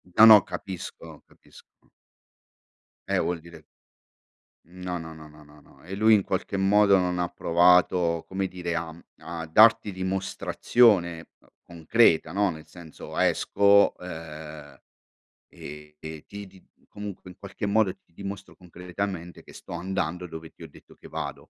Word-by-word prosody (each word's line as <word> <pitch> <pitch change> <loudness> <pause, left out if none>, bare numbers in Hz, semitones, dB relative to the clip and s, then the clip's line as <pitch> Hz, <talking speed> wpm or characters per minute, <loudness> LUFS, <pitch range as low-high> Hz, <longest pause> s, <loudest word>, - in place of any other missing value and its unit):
No, 110 - +9
no, 110 -2 +9
capisco, 95 -3 -8
capisco. - - -22 1.2
Eh, - - +1
vuol 85 -1 -1
dire 85 -1 -14 1.1
Mhmm, 90 +1 -14
no, 90 -1 -3
no, 80 -1 -8
no, 80 -1 -13
no, 75 0 -17
no, 75 0 -19
no - - -22
e 90 +4 -9
lui 110 +2 +4
in 100 - +1
qualche 95 +1 -3
modo 100 +1 +4
non 90 -1 -1
ha 90 - 0
provato, 85 -1 +3
come 95 0 -2
dire, 90 -2 -5
a 80 -1 -3
mhmm, 80 - -14 0.2
a 85 -1 -7
darti 105 +5 +5
dimostrazione 95 -1 +1 0.3
concreta, 85 -1 +2
no, 100 0 +1
nel 80 -2 -8
senso, 85 -3 -11
esco, 100 0 +3
uhm, 80 -4 -9 0.7
e 75 0 -12
e 80 -1 -9
ti 100 0 -9
di 95 -1 -19 0.2
comunque 100 -3 -9
in 90 - -15
qualche 100 +1 -6
modo 100 -2 +2
ti - - -27
ti - - -35
dimostro 100 +2 -8
concretamente 90 0 -7
che - - -16
sto - - -12
andando 90 -2 -3
dove 80 -1 -9
ti - - -17
ho 80 - -9
detto - - -18
che - - -15
vado. - - -6
90 Hz, 155 wpm, -26 LUFS, 80-100 Hz, 1.2 s, No